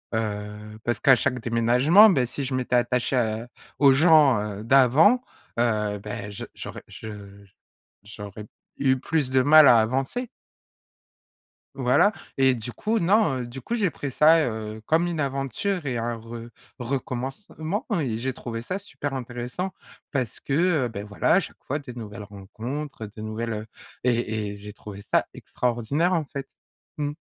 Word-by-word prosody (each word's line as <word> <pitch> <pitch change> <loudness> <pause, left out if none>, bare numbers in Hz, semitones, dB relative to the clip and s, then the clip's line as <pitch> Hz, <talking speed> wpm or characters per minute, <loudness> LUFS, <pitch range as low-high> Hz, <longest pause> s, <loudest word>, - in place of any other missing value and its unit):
Heu, 105 0 -4
parce 120 -2 -1
qu'à 135 -2 +6
chaque 125 0 -1
déménagement, 125 - +5
ben, 135 -10 +2
si 135 +3 -4
je 130 - -3
m'étais 130 -1 0
attachée 125 +1 +1
à 110 -1 -1 0.3
aux 140 -2 +7
gens, 145 -4 +6
heu, 105 0 -5
d'avant, 135 - +5 0.4
heu, 105 -3 +1
bah, 105 0 -6
je 105 +4 -7
j'aurais - - -8
je 100 -2 -10 0.6
j'aurai 105 0 -9 0.3
eu 130 -1 +2
plus 145 +1 -1
de 130 0 +3
mal 150 +2 +8
à 120 - +7
avancer. 135 - -2 1.5
Voilà 135 +10 +4 0.3
et 130 -1 +4
du 120 0 -5
coup, 220 - -1
non, 185 -6 +3
heu, 120 - -4
du 125 +3 -8
coup, 230 - -5
j'ai 210 -6 +2
pris 145 -3 -6
ça, 155 +3 +5
heu, 110 -1 -5
comme 165 +5 +2
une 170 -2 -3
aventure 140 - -2
et 125 - -1
un 115 0 -2
re 115 +1 -9 0.3
recommencement 135 - -4
et 115 -7 -2
j'ai 130 +2 -1
trouvé 115 -2 -6
ça 185 +11 -3
super 145 -8 -6
intéressant. 125 +8 -4 0.4
Parce 130 -6 -2
que, 135 - -4 0.3
heu, - - 0
beh, 100 -3 -6
voilà, 100 0 -1
à - - +6
chaque - - -8
fois 145 +3 -2
des 140 -4 -9
nouvelles 105 -3 -7
rencontres, 110 +7 -6
heu, - - -7
des 105 +1 -10
nouvelles 110 +1 -3
heu 105 0 -5 0.4
et 110 -4 0
et - - -7
j'ai 105 +1 -9
trouvé 100 -1 -10
ça - - +3
extraordinaire, 125 +9 -1
en 165 -4 +1
fait, 135 0 -7 0.5
mmh. 145 0 -1
125 Hz, 165 wpm, -25 LUFS, 110-145 Hz, 1.5 s, mal